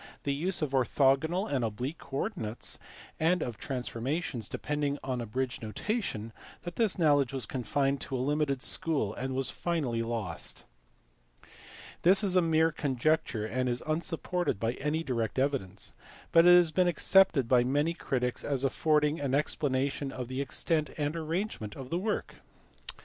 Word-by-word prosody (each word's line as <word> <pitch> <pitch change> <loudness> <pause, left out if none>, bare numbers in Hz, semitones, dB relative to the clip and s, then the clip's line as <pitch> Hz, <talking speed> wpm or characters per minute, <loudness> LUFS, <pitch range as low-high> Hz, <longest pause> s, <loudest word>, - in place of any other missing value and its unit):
79 - - -24
the 140 - 0
use 175 +6 0
of 145 - -1
orthogonal 135 - +2
and 135 -4 0
oblique 125 +8 -3
coordinates, 135 - -4 0.4
and 165 +2 +2
of 120 - -4
transfor 125 -3 -4
mations 135 - -2
depending 145 -1 -2
on 130 -2 -2
abridged 125 +3 -3
notation 115 - -3 0.3
that 175 0 -6
this 225 -5 +2
knowledge 145 -6 +3
was 135 -4 -2
confined 135 +3 -1
to 135 - -4
a - - 0
limited 140 0 0
school, 140 -11 +2
and 130 +2 -4
was 135 -1 0
finally 145 -10 -1
lost. 110 -8 -4 1.4
This 190 +4 +5
is 190 -2 +2
a 185 - +6
mere 160 -1 +3
conjecture 145 -5 0
and 125 +3 -1
is 120 0 -2
unsupported 165 - -1
by 115 +2 0
any 150 +4 -2
direct 115 -6 -2
evidence, 130 -8 -2 0.4
but 165 +1 +6
it 175 0 +9
has 175 -3 +4
been 180 +2 +3
accepted 175 -5 +4
by 125 0 +5
many 145 +6 +1
critics 125 -6 -2
as 140 -2 -1
affording 150 +2 +2
an 140 -2 0
ex 145 +1 +1
planation 135 0 -1
of 125 -2 -5
the 130 +2 -3
extent 150 +3 0
and 150 +1 -1
arrangement 165 - -3
of 135 -1 -9
the 170 - 0
work. 210 +2 -3
140 Hz, 160 wpm, -30 LUFS, 125-160 Hz, 1.4 s, it